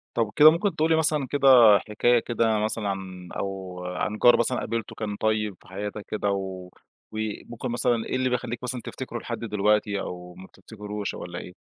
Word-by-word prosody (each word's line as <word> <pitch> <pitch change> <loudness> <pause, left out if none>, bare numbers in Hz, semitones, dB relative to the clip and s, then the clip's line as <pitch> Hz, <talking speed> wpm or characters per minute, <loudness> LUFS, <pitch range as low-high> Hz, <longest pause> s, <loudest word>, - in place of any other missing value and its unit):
طَب 115 -3 0
كده 155 +1 +9
ممكن 175 +2 -1
تقول 160 0 +1
لي 160 - +4
مثلًا 150 -4 +1
كده 140 -1 +1 0.4
حكاية 120 +3 +3
كده 115 -2 0
مثلًا 105 -1 -1
عن 95 -2 -6
أو 95 -2 -5
عن 105 +4 -3
جار 120 +1 +6
مثلًا 125 +2 +1
قابلته 115 -2 -4
كان 105 -2 -4
طيّب 105 -2 -1
في - - -20
حياتك 100 +2 -6
كده 105 -2 -1
و 95 -2 -4 0.4
وممكن 110 +3 -5
مثلًا 120 -1 0
إيه - - -3
اللي 130 0 +1
بيخلّيك 120 -1 -3
مثلًا 125 -1 -3
تفتكره 120 -3 -6
لحد 120 - -5
دلوقتي 105 -2 +1
أو 90 -1 -7
ما 95 - -11
بتفتكروش 105 +1 -7
والّا 85 0 -7
إيه؟ 90 - -10
110 Hz, 185 wpm, -25 LUFS, 100-120 Hz, 0.4 s, كده